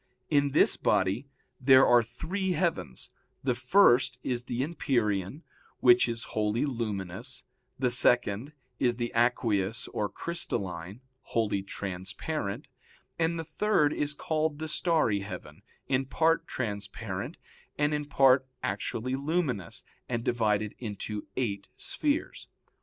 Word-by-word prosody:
In 145 Hz, -1 st, +4 dB
this -, -, +4 dB
body 100 Hz, +9 st, +1 dB, 0.3 s
there 130 Hz, 0 st, +7 dB
are 120 Hz, -1 st, +6 dB
three 175 Hz, -, -3 dB
heavens; 165 Hz, -, -2 dB, 0.3 s
the 130 Hz, -2 st, +2 dB
first 125 Hz, -1 st, +4 dB
is 125 Hz, -1 st, -1 dB
the 125 Hz, +1 st, -1 dB
empyrean, 125 Hz, -, -1 dB, 0.4 s
which 120 Hz, -1 st, +6 dB
is 115 Hz, 0 st, -3 dB
wholly 110 Hz, +4 st, +1 dB
luminous; 115 Hz, -1 st, -4 dB, 0.3 s
the 125 Hz, -2 st, +1 dB
second 120 Hz, +1 st, +2 dB, 0.3 s
is 120 Hz, -2 st, +2 dB
the 120 Hz, 0 st, -3 dB
aqueous 115 Hz, -3 st, +1 dB
or 105 Hz, -1 st, -2 dB
crystalline, 100 Hz, -, -3 dB, 0.2 s
wholly 110 Hz, -5 st, 0 dB
transparent; 100 Hz, -, -4 dB, 0.5 s
and 165 Hz, +1 st, +1 dB
the 165 Hz, -, -3 dB
third 155 Hz, -2 st, +2 dB
is 150 Hz, 0 st, -2 dB
called 155 Hz, 0 st, -1 dB
the 160 Hz, +1 st, -4 dB
starry 155 Hz, -, +2 dB
heaven, 100 Hz, +1 st, -8 dB, 0.3 s
in 135 Hz, +1 st, +1 dB
part 165 Hz, +3 st, +2 dB
transparent, 105 Hz, -, -4 dB, 0.4 s
and 150 Hz, 0 st, +2 dB
in 150 Hz, 0 st, -1 dB
part 135 Hz, -2 st, +4 dB, 0.2 s
actually 110 Hz, +5 st, -2 dB
luminous, 140 Hz, -, -1 dB, 0.3 s
and 120 Hz, -2 st, -1 dB
divided 110 Hz, -3 st, +1 dB
into 105 Hz, -2 st, -5 dB
eight 100 Hz, -6 st, -2 dB
spheres. 295 Hz, +1 st, -1 dB
125 Hz, 120 wpm, -29 LUFS, 105-145 Hz, 0.5 s, there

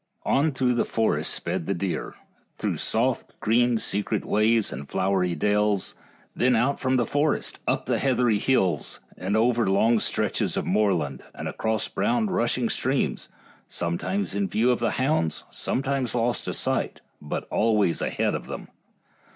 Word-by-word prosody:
On 150 Hz, +3 st, +2 dB
through 130 Hz, -2 st, +1 dB
the 120 Hz, -, +2 dB
forest 115 Hz, -1 st, 0 dB
sped 85 Hz, -1 st, -2 dB
the 100 Hz, -, 0 dB
deer, 90 Hz, +1 st, -3 dB, 0.4 s
through -, -, -2 dB
soft, -, -, -1 dB
green, 120 Hz, +2 st, +3 dB
secret 105 Hz, -2 st, -1 dB
ways 110 Hz, +1 st, +2 dB
and 70 Hz, +2 st, -7 dB
flowery 95 Hz, -2 st, +1 dB
dells, 105 Hz, +2 st, +1 dB, 0.4 s
then 125 Hz, 0 st, +3 dB
out 125 Hz, +5 st, +1 dB
from 130 Hz, 0 st, +1 dB
the 120 Hz, -, +2 dB
forest, 145 Hz, +5 st, 0 dB
up -, -, 0 dB
heathery 125 Hz, -5 st, +2 dB
hills, 95 Hz, -, +1 dB, 0.2 s
and 100 Hz, +4 st, -1 dB
over 120 Hz, -1 st, +2 dB
long 110 Hz, +4 st, +3 dB
stretches -, -, 0 dB
of -, -, -1 dB
moorland, 90 Hz, -10 st, +1 dB
and -, -, -5 dB
across 110 Hz, 0 st, -1 dB
brown 235 Hz, 0 st, 0 dB
rushing 120 Hz, -4 st, +1 dB
streams, 130 Hz, +4 st, -1 dB, 0.4 s
sometimes 85 Hz, -, -2 dB
in 200 Hz, -, 0 dB
view 120 Hz, -, +2 dB
of 125 Hz, -, 0 dB
the -, -, +1 dB
hounds, 130 Hz, -, 0 dB
sometimes 135 Hz, -3 st, -1 dB
lost 120 Hz, 0 st, 0 dB
to -, -, -2 dB
sight, -, -, -1 dB, 0.2 s
but 75 Hz, -, -4 dB
always 105 Hz, -5 st, +2 dB
ahead -, -, 0 dB
of -, -, -4 dB
them. -, -, -7 dB
115 Hz, 150 wpm, -25 LUFS, 100-130 Hz, 0.4 s, green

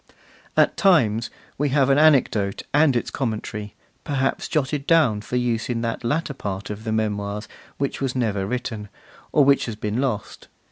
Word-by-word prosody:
At -, -, +4 dB
times 115 Hz, -, +3 dB, 0.3 s
we 145 Hz, 0 st, +1 dB
have 135 Hz, 0 st, +3 dB
an 135 Hz, -, +4 dB
anecdote 125 Hz, -10 st, +3 dB
and 145 Hz, -2 st, +4 dB
its 120 Hz, -, -1 dB
commentary, 110 Hz, -4 st, -4 dB, 0.3 s
perhaps 135 Hz, -3 st, -1 dB
jotted 145 Hz, -2 st, -1 dB
down 145 Hz, -11 st, +4 dB
for 115 Hz, -, -5 dB
use 120 Hz, -2 st, 0 dB
in 115 Hz, -2 st, -1 dB
that 115 Hz, 0 st, -3 dB
latter 150 Hz, +5 st, -1 dB
part 100 Hz, -5 st, -5 dB
of 105 Hz, +2 st, -7 dB
the 110 Hz, -, -2 dB
Memoirs 105 Hz, -1 st, -2 dB, 0.3 s
which 140 Hz, 0 st, -2 dB
was 135 Hz, -2 st, -1 dB
never 105 Hz, -6 st, 0 dB
written, 110 Hz, -3 st, -4 dB, 0.4 s
or 145 Hz, -, +5 dB
which 140 Hz, -2 st, +3 dB
has 115 Hz, -, -4 dB
been 105 Hz, +3 st, -2 dB
lost. 120 Hz, -7 st, -3 dB
120 Hz, 170 wpm, -23 LUFS, 105-140 Hz, 0.4 s, or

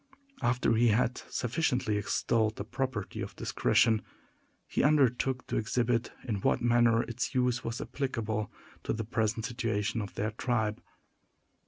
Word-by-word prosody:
After 120 Hz, -1 st, +2 dB
he 115 Hz, +2 st, +4 dB
had 115 Hz, +3 st, +2 dB
sufficiently 125 Hz, -3 st, 0 dB
extolled 110 Hz, +2 st, +1 dB
the -, -, -4 dB
property 120 Hz, -2 st, -3 dB
of -, -, -6 dB
discretion, 110 Hz, -2 st, +2 dB, 0.7 s
he -, -, 0 dB
undertook 130 Hz, -3 st, +2 dB
to -, -, -2 dB
exhibit 120 Hz, +1 st, 0 dB
in 110 Hz, -5 st, -2 dB
what -, -, +2 dB
manner 120 Hz, -1 st, +4 dB
its 120 Hz, +2 st, -4 dB
use 125 Hz, -1 st, +1 dB
was 115 Hz, +1 st, -3 dB
applicable 110 Hz, -6 st, -2 dB, 0.3 s
to -, -, -2 dB
the 110 Hz, -1 st, -3 dB
present 110 Hz, +1 st, 0 dB
situation 115 Hz, -2 st, -1 dB
of 100 Hz, -, -7 dB
their 110 Hz, +2 st, -1 dB
tribe. 110 Hz, -2 st, -1 dB
115 Hz, 140 wpm, -30 LUFS, 110-125 Hz, 0.7 s, he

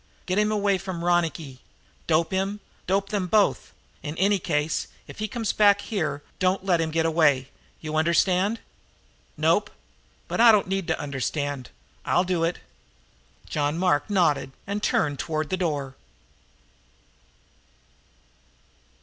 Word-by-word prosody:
Get 185 Hz, +2 st, 0 dB
him 210 Hz, 0 st, +2 dB
away 200 Hz, -2 st, +1 dB
from 180 Hz, -3 st, -5 dB
Ronicky 165 Hz, -6 st, 0 dB, 0.5 s
dope 160 Hz, 0 st, +2 dB
him 195 Hz, +2 st, -1 dB, 0.3 s
dope 195 Hz, +1 st, +1 dB
them 200 Hz, -3 st, -1 dB
both. 210 Hz, +2 st, +2 dB, 0.3 s
In 150 Hz, +1 st, -6 dB
any 200 Hz, +2 st, +3 dB
case, 155 Hz, -3 st, -1 dB, 0.2 s
if -, -, -12 dB
he 215 Hz, -, -1 dB
comes 230 Hz, -3 st, -2 dB
back 205 Hz, -1 st, +5 dB
here, 155 Hz, -10 st, -3 dB, 0.2 s
don't 185 Hz, +1 st, +1 dB
let 175 Hz, -4 st, +2 dB
him 160 Hz, -, -1 dB
get 160 Hz, +1 st, 0 dB
away. 150 Hz, -5 st, +3 dB, 0.3 s
You 155 Hz, -1 st, -5 dB
understand?" 180 Hz, +6 st, +2 dB, 0.8 s
"Nope, -, -, +2 dB, 0.6 s
but -, -, 0 dB
I 235 Hz, -1 st, +9 dB
don't 210 Hz, -2 st, +3 dB
need 195 Hz, -1 st, -2 dB
to 160 Hz, -, -1 dB
understand. 140 Hz, -1 st, -3 dB, 0.3 s
I'll 180 Hz, -, +2 dB
do 180 Hz, -2 st, 0 dB
it." 165 Hz, +1 st, 0 dB, 0.9 s
John 145 Hz, +1 st, -1 dB
Mark 180 Hz, -1 st, +1 dB
nodded 150 Hz, -9 st, +1 dB
and 200 Hz, +1 st, -3 dB
turned 145 Hz, -8 st, 0 dB
toward 155 Hz, 0 st, -2 dB
the -, -, +2 dB
door. 145 Hz, -7 st, -2 dB
175 Hz, 135 wpm, -25 LUFS, 155-195 Hz, 0.9 s, I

